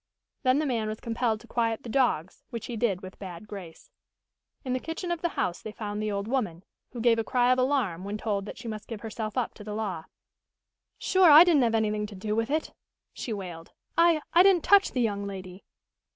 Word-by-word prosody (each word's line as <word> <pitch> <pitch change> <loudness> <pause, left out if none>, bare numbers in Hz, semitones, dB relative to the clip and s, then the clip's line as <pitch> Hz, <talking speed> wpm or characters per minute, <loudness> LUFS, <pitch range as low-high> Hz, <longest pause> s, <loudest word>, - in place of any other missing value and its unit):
Then 255 0 +3
the 305 - +1
man 230 -5 -1
was 215 0 -4
compelled 230 -1 -1
to 235 - -16
quiet 230 -2 -1
the - - -8
dogs, 220 - 0
which 230 -2 -6
he 240 - -5
did 210 -5 0
with 185 -1 -10
bad 185 +1 -8
grace. 195 - -10 0.7
In 255 - -1
the 255 - 0
kitchen 330 +5 -5
of 340 -2 -2
the 345 - +1
house 175 - -1
they 215 - -7
found 210 -1 -5
the 215 0 -1
old 200 0 -3
woman, 210 -9 -2 0.3
who 245 - -7
gave 230 0 +3
a - - +1
cry 245 +1 +2
of 255 - +3
alarm 255 -10 0
when 200 +2 -4
told 205 -2 -2
that - - -8
she 235 - -8
must 215 -1 -6
give 225 -3 -7
herself 220 +1 -5
up 250 - -1
to 210 - -12
the 210 0 -5
law. 190 -7 -3 0.9
"Sure, 375 -3 +4
I 305 +2 +11
didn't 335 -6 +4
have 230 -2 +2
anything 210 -1 0
to 205 - -11
do 210 +3 -3
with 225 +2 0
it!" 310 +2 -1 0.4
she 240 - -5
wailed. 180 -5 -7 0.2
"I 335 -2 +4
I 345 - +7
didn't 375 -3 +5
touch 400 -1 +5
the 250 - +1
young 200 -3 -1
lady!" 185 -1 -8
225 Hz, 225 wpm, -28 LUFS, 205-255 Hz, 0.9 s, I